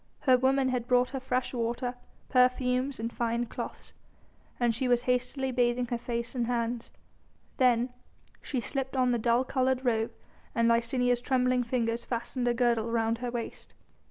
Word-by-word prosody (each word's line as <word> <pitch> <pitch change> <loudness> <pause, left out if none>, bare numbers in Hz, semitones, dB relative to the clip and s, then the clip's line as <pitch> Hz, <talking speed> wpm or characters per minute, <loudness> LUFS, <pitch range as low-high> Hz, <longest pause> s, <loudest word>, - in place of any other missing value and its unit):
Her 260 -3 +5
women 260 +1 +2
had 245 -2 -2
brought 250 0 +3
her 270 - -3
fresh 255 0 -2
water, 240 +1 -2 0.3
perfumes 255 0 +2
and 230 +1 -3
fine 235 0 0
cloths, - - -7 0.7
and 240 -2 +2
she 255 +3 0
was 245 -1 +3
hastily 255 +2 0
bathing 245 0 +1
her 240 - -1
face 235 0 -3
and 240 -3 -1
hands. 235 -1 -2 0.7
Then, 245 -1 +3 0.5
she 265 - -2
slipped 270 +2 -3
on 255 -1 +3
the 240 - +1
dull 235 +2 +3
coloured 260 0 0
robe 225 -2 +1 0.4
and 230 0 +3
Licinia's 240 +1 +2
trembling 255 -1 +2
fingers 235 -1 -1
fastened 245 +1 -3
a 240 - +3
girdle 235 -2 +2
round 230 0 0
her 245 0 -3
waist. 240 -1 -6
245 Hz, 160 wpm, -29 LUFS, 235-255 Hz, 0.7 s, Her